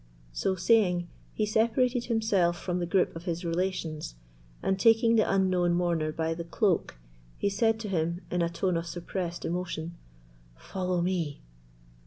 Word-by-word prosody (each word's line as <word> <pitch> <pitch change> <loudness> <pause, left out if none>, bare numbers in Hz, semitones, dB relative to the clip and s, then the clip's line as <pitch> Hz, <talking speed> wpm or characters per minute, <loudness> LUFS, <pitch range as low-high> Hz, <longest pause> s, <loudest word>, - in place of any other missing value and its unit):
So 190 - 0
saying, 180 -3 +3 0.2
he 215 - 0
separated 235 +3 +2
himself 200 -7 +1
from 180 -1 -2
the 175 - -2
group 180 -1 +2
of 165 +1 -8
his 175 0 -3
relations, 165 - -2 0.5
and 190 0 +1
taking 230 +2 +5
the 220 - +3
unknown 185 -3 +2
mourner 170 -3 0
by 160 +1 -1
the 170 +1 -5
cloak, 170 - 0 0.4
he 200 - +1
said 225 +2 +2
to 215 - -4
him, 170 -2 -1
in 180 - +1
a 170 - +1
tone 175 +1 0
of 165 0 -4
suppressed 175 0 -4
emotion, 170 -1 -3 0.6
"Follow 180 - -2
me." 170 -5 -2
180 Hz, 155 wpm, -28 LUFS, 170-200 Hz, 0.6 s, taking